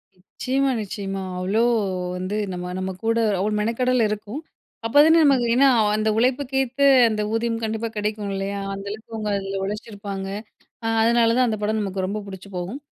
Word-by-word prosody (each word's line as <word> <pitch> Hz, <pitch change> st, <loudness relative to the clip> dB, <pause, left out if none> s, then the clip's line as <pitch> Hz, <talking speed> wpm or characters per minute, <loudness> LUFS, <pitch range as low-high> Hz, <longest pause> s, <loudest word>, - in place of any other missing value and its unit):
நிச்சயமா 265 Hz, +8 st, -1 dB
நிச்சயமா. 195 Hz, -1 st, -4 dB, 0.2 s
அவ்ளோ 200 Hz, +5 st, +1 dB, 0.5 s
வந்து, 185 Hz, +3 st, -3 dB, 0.2 s
நம்ம 180 Hz, 0 st, -5 dB
நம்ம 190 Hz, 0 st, -2 dB
கூட 230 Hz, +1 st, +1 dB, 0.2 s
அவ்ளோ 210 Hz, +3 st, 0 dB
மெனக்கெடல் 250 Hz, +3 st, +1 dB
இருக்கும். 210 Hz, +6 st, -5 dB, 0.4 s
அப்போதானே 295 Hz, +7 st, +6 dB
நமக்கு 270 Hz, -5 st, +4 dB
ஏன்னா 270 Hz, +3 st, +5 dB, 0.3 s
அந்த 215 Hz, 0 st, +1 dB
உழைப்புக்கேத்த 265 Hz, +2 st, 0 dB, 0.3 s
அந்த 215 Hz, -1 st, -1 dB
ஊதியம் 230 Hz, 0 st, -1 dB
கண்டிப்பா 220 Hz, +1 st, -2 dB
கிடைக்கும் 210 Hz, -1 st, -2 dB
இல்லயா? 195 Hz, +1 st, -3 dB
அந்தளவுக்கு 200 Hz, +3 st, -7 dB
அவுங்க 215 Hz, -1 st, -3 dB
அதில 195 Hz, 0 st, -4 dB
உழைச்சிருப்பாங்க 200 Hz, -1 st, -5 dB, 0.6 s
அ, -, -, -1 dB, 0.2 s
அதனால 230 Hz, 0 st, +4 dB
தான் 255 Hz, 0 st, +4 dB
அந்த 220 Hz, -, -1 dB
படம் 215 Hz, +1 st, 0 dB
நமக்கு 195 Hz, -2 st, -2 dB
ரொம்ப 200 Hz, +3 st, -3 dB
புடிச்சு 195 Hz, 0 st, -9 dB
போகும். 180 Hz, +9 st, -4 dB
215 Hz, 155 wpm, -23 LUFS, 195-235 Hz, 0.6 s, அப்போதானே